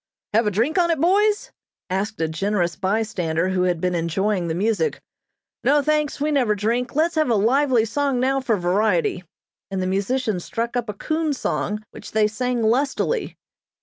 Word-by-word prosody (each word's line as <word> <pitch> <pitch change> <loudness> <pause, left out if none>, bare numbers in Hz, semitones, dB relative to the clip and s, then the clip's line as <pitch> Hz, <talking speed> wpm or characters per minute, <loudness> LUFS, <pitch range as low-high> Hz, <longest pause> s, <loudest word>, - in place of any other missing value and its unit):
"Have 225 +1 +3
a - - +4
drink 235 - +1
on 345 -1 +3
it, 330 -3 +1
boys?" 415 - +2 0.4
asked 195 +3 -2
a 160 - +2
generous 175 +1 -1
bystander 185 -4 -1
who 185 -1 0
had 175 -2 0
been 180 +1 0
enjoying 175 +3 0
the 160 - -2
music. 200 -2 0 0.6
"No, 285 +2 +3
thanks, 300 -1 0
we 300 +2 0
never 250 -7 +2
drink. 235 +6 -1
Let's 325 +3 +2
have 310 -4 +1
a 230 - +3
lively 245 +2 +3
song 275 +3 0
now 265 +2 +2
for 230 -4 +1
variety," 180 0 +1 0.5
and 195 -1 -3
the 185 - -1
musician 200 +3 0
struck 230 +7 -4
up 240 -2 -1
a 210 - -4
coon 310 +6 -1
song, 215 -5 -2
which - - -11
they 220 -1 +4
sang 245 +2 -1
lustily. 275 - 0
220 Hz, 180 wpm, -22 LUFS, 190-275 Hz, 0.6 s, a